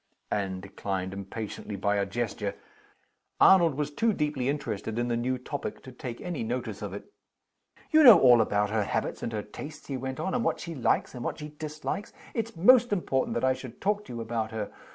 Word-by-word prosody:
Anne 95 Hz, -2 st, -1 dB
declined 95 Hz, -1 st, -4 dB
impatiently, 100 Hz, +1 st, -6 dB
by 100 Hz, +1 st, +1 dB
a 100 Hz, -1 st, 0 dB
gesture. 105 Hz, -1 st, -3 dB, 0.8 s
Arnold 170 Hz, -6 st, +6 dB
was 150 Hz, 0 st, -2 dB
too 225 Hz, +8 st, +1 dB
deeply 150 Hz, -6 st, -1 dB
interested 110 Hz, -6 st, -3 dB
in 120 Hz, 0 st, 0 dB
the 120 Hz, -, +1 dB
new 125 Hz, +2 st, 0 dB
topic 140 Hz, +3 st, -5 dB
to 130 Hz, -, -10 dB
take 125 Hz, -1 st, -7 dB
any 175 Hz, -4 st, -4 dB
notice 115 Hz, -2 st, -3 dB
of 105 Hz, -3 st, -4 dB
it. 100 Hz, -, -9 dB, 0.8 s
"You 315 Hz, 0 st, +7 dB
know 230 Hz, -, +11 dB
all 120 Hz, -3 st, +7 dB
about 105 Hz, -1 st, +1 dB
her 110 Hz, -1 st, +1 dB
habits -, -, -2 dB
and 115 Hz, -, -3 dB
her 105 Hz, -2 st, -3 dB
tastes," 145 Hz, +8 st, -9 dB
he 135 Hz, -, -3 dB
went 130 Hz, +1 st, -5 dB
on, 190 Hz, +4 st, -2 dB
"and 245 Hz, -, +1 dB
what -, -, 0 dB
she 170 Hz, -, -6 dB
likes, 130 Hz, -6 st, +1 dB
and 125 Hz, -2 st, -6 dB
what -, -, -3 dB
she 150 Hz, -1 st, -7 dB
dislikes. 155 Hz, +6 st, -5 dB, 0.2 s
It's 225 Hz, -2 st, -3 dB
most 245 Hz, +7 st, +6 dB
important 155 Hz, -9 st, 0 dB
that 120 Hz, -, -1 dB
I 130 Hz, -, +4 dB
should 130 Hz, -2 st, -9 dB
talk 205 Hz, +1 st, 0 dB
to -, -, -8 dB
you 115 Hz, -, -4 dB
about 110 Hz, -1 st, -2 dB
her. 110 Hz, -2 st, -4 dB
125 Hz, 210 wpm, -28 LUFS, 105-155 Hz, 0.8 s, know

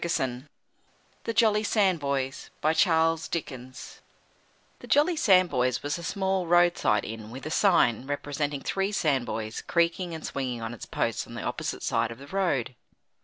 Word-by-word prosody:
NEWMAN 130 Hz, -5 st, -2 dB, 0.8 s
THE -, -, -1 dB
JOLLY 215 Hz, -3 st, +4 dB
SANDBOYS 145 Hz, -, 0 dB
The 155 Hz, +1 st, +3 dB, 2.1 s
Jolly 305 Hz, +4 st, +3 dB
Sandboys 180 Hz, -, +3 dB
was 145 Hz, +4 st, -2 dB
a -, -, -8 dB
small 190 Hz, 0 st, -1 dB
road 175 Hz, 0 st, +5 dB
side 105 Hz, -, +1 dB
inn 110 Hz, -1 st, -7 dB
with 130 Hz, +4 st, -9 dB
a 155 Hz, -, -4 dB
sign, 135 Hz, -, +3 dB
representing 145 Hz, 0 st, -2 dB
three 195 Hz, +1 st, -1 dB
Sandboys, 125 Hz, -, -1 dB
creaking 170 Hz, 0 st, 0 dB
and 160 Hz, -, -7 dB
swinging 130 Hz, -3 st, -3 dB
on 115 Hz, +1 st, -4 dB
its 120 Hz, -, -9 dB
post -, -, -2 dB
on -, -, -10 dB
the -, -, -5 dB
opposite -, -, -3 dB
side -, -, +1 dB
of 115 Hz, -, -8 dB
the 140 Hz, -, -11 dB
road. 145 Hz, -8 st, -1 dB
150 Hz, 145 wpm, -27 LUFS, 130-185 Hz, 2.1 s, road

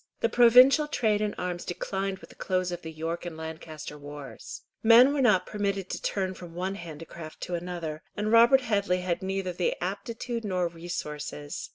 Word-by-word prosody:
The 230 Hz, -, +3 dB
provincial 250 Hz, +6 st, +7 dB
trade 215 Hz, -8 st, +1 dB
in 210 Hz, -1 st, -1 dB
arms 180 Hz, -1 st, -3 dB
declined 195 Hz, +2 st, -3 dB
with -, -, -14 dB
the -, -, -16 dB
close 185 Hz, -1 st, -1 dB
of 175 Hz, 0 st, -5 dB
the 160 Hz, -, -7 dB
York 165 Hz, +2 st, -4 dB
and 170 Hz, -2 st, -6 dB
Lancaster 160 Hz, -2 st, -7 dB
wars. 145 Hz, -, -9 dB, 0.2 s
Men 240 Hz, +5 st, +7 dB
were 290 Hz, -, +1 dB
not 200 Hz, -7 st, +4 dB
permitted 200 Hz, -2 st, -2 dB
to -, -, -4 dB
turn 190 Hz, -2 st, -1 dB
from 175 Hz, -2 st, -11 dB
one 185 Hz, +2 st, -2 dB
handicraft 165 Hz, -2 st, -9 dB
to 180 Hz, -, -4 dB
another, 170 Hz, -3 st, -4 dB, 0.2 s
and 210 Hz, +1 st, -1 dB
Robert 235 Hz, +4 st, +7 dB
Headley 200 Hz, -6 st, 0 dB
had 180 Hz, -2 st, -1 dB
neither 190 Hz, -1 st, -2 dB, 0.2 s
aptitude 230 Hz, +5 st, -4 dB
nor 185 Hz, -4 st, 0 dB
resources. 150 Hz, -3 st, -6 dB
185 Hz, 175 wpm, -28 LUFS, 165-215 Hz, 0.2 s, provincial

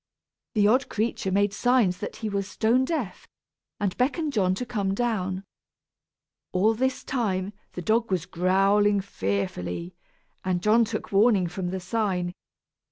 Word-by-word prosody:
The 205 Hz, -1 st, +4 dB
odd 255 Hz, +5 st, +3 dB
creature 215 Hz, -3 st, -1 dB
made 200 Hz, +1 st, +2 dB
signs 230 Hz, -5 st, +2 dB
that 205 Hz, -, -5 dB
he 220 Hz, -, -4 dB
was 200 Hz, -2 st, -2 dB
stone 235 Hz, +5 st, +2 dB
deaf, 275 Hz, -, -3 dB, 0.5 s
and 200 Hz, -3 st, -1 dB
beckoned 290 Hz, +4 st, 0 dB
John 185 Hz, -4 st, +2 dB
to 250 Hz, -, -4 dB
come 200 Hz, -5 st, -1 dB
down. 195 Hz, -5 st, -1 dB, 1.1 s
All 205 Hz, +5 st, +3 dB
this 260 Hz, +3 st, -1 dB
time, 205 Hz, -6 st, -1 dB, 0.2 s
the 180 Hz, -, -6 dB
dog 225 Hz, +5 st, +2 dB
was 180 Hz, -3 st, 0 dB
growling 195 Hz, +3 st, +3 dB
fearfully, 95 Hz, -, -3 dB, 0.5 s
and 180 Hz, -1 st, -1 dB
John 225 Hz, +2 st, +5 dB
took 220 Hz, -, -5 dB
warning 200 Hz, -1 st, +4 dB
from 180 Hz, +1 st, -3 dB
the 190 Hz, +1 st, -3 dB
sign. 185 Hz, -2 st, -1 dB
200 Hz, 145 wpm, -26 LUFS, 185-225 Hz, 1.1 s, John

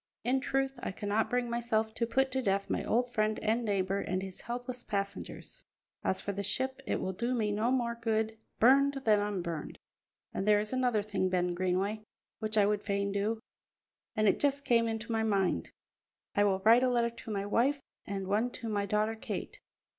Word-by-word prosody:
In 255 Hz, +3 st, +2 dB
truth, 270 Hz, -1 st, -1 dB
I -, -, -3 dB
cannot 205 Hz, +3 st, -1 dB
bring 245 Hz, 0 st, 0 dB
myself 230 Hz, -2 st, 0 dB
to 230 Hz, +1 st, -1 dB
put 265 Hz, +3 st, +2 dB
to 265 Hz, 0 st, 0 dB
death 195 Hz, -3 st, 0 dB
my -, -, 0 dB
old 245 Hz, +2 st, +1 dB
friend 215 Hz, 0 st, +1 dB
and 225 Hz, +2 st, 0 dB
neighbour 195 Hz, -2 st, 0 dB
and 185 Hz, -1 st, -2 dB
his 190 Hz, -1 st, -6 dB
helpless 245 Hz, +1 st, -5 dB
passengers. 200 Hz, -1 st, -5 dB, 0.4 s
As 190 Hz, -, +1 dB
for 200 Hz, -, -3 dB
the 200 Hz, 0 st, -3 dB
ship, 260 Hz, +7 st, -1 dB
it -, -, 0 dB
will 190 Hz, -, -2 dB
do 240 Hz, +6 st, -1 dB
me 215 Hz, -3 st, +1 dB
no 215 Hz, +3 st, +1 dB
more 245 Hz, -2 st, +1 dB
good 220 Hz, -1 st, 0 dB, 0.2 s
burned 275 Hz, +4 st, +5 dB
than 215 Hz, -2 st, +5 dB
unburned. 180 Hz, -6 st, -3 dB, 0.6 s
And 195 Hz, -, -2 dB
there 210 Hz, -1 st, +6 dB
is 210 Hz, +3 st, -3 dB
another 250 Hz, -5 st, +2 dB
thing, 200 Hz, -3 st, 0 dB
Ben 180 Hz, -1 st, +1 dB
Greenway, 185 Hz, +4 st, 0 dB, 0.4 s
which 215 Hz, 0 st, -1 dB
I 205 Hz, -, +6 dB
would 205 Hz, 0 st, +1 dB
fain 200 Hz, -1 st, -1 dB
do, 205 Hz, +3 st, 0 dB, 0.8 s
and 215 Hz, -1 st, +3 dB
it -, -, +3 dB
just 280 Hz, 0 st, +1 dB
came 230 Hz, -1 st, +4 dB
into 225 Hz, +1 st, -3 dB
my 225 Hz, -1 st, +1 dB
mind. 195 Hz, -, +1 dB, 0.7 s
I 205 Hz, -, +4 dB
will 190 Hz, -1 st, +1 dB
write 230 Hz, +4 st, +6 dB
a 255 Hz, -, +3 dB
letter 235 Hz, -1 st, +2 dB
to 230 Hz, -1 st, -9 dB
my 200 Hz, -1 st, -2 dB
wife 255 Hz, +7 st, +2 dB, 0.2 s
and 195 Hz, -1 st, -4 dB
one 210 Hz, +5 st, +1 dB
to 230 Hz, -, -5 dB
my 205 Hz, -1 st, 0 dB
daughter 215 Hz, +2 st, +1 dB
Kate. 220 Hz, -, -5 dB
215 Hz, 200 wpm, -31 LUFS, 200-240 Hz, 0.8 s, there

